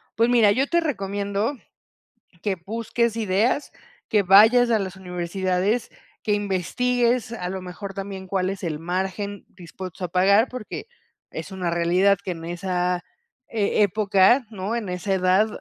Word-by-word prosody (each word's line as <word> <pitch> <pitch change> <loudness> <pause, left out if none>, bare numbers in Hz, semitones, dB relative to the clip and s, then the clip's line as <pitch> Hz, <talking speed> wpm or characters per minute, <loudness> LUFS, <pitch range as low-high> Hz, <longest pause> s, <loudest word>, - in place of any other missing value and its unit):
Pues 230 +1 +3
mira, 230 -4 +5
yo 260 +7 +1
te 340 +3 +2
recomiendo, 200 -2 -2 0.8
que 205 -3 -1
busques 230 +1 -1
ideas, 220 +6 0 0.4
que 210 -3 +3
vayas 220 +6 +7
a 220 - +3
las 190 -1 -4
universidades. 185 +4 -1 0.3
Que 210 - +1
investigues, 235 +5 0
a 180 -6 -4
lo 190 0 -4
mejor, 195 +2 -8
también, 195 -1 -6
cuál 185 0 0
es 195 - -7
el 160 -3 -2
margen, 190 +4 -3
dispuestos 185 0 -9
a - - -1
pagar. 195 +6 +4
Porque 250 -4 -7 0.5
es - - -7
una 185 -2 -2
realidad, 175 +4 +3
que - - -6
en 165 -2 -7
esa, 180 0 -1 0.5
eh, 215 -1 +1
época, 205 +4 +3
¿no? 205 +2 -3
En 230 -4 -3
esa 180 +2 -2
edad, 185 +3 +3
195 Hz, 150 wpm, -23 LUFS, 185-220 Hz, 0.8 s, vayas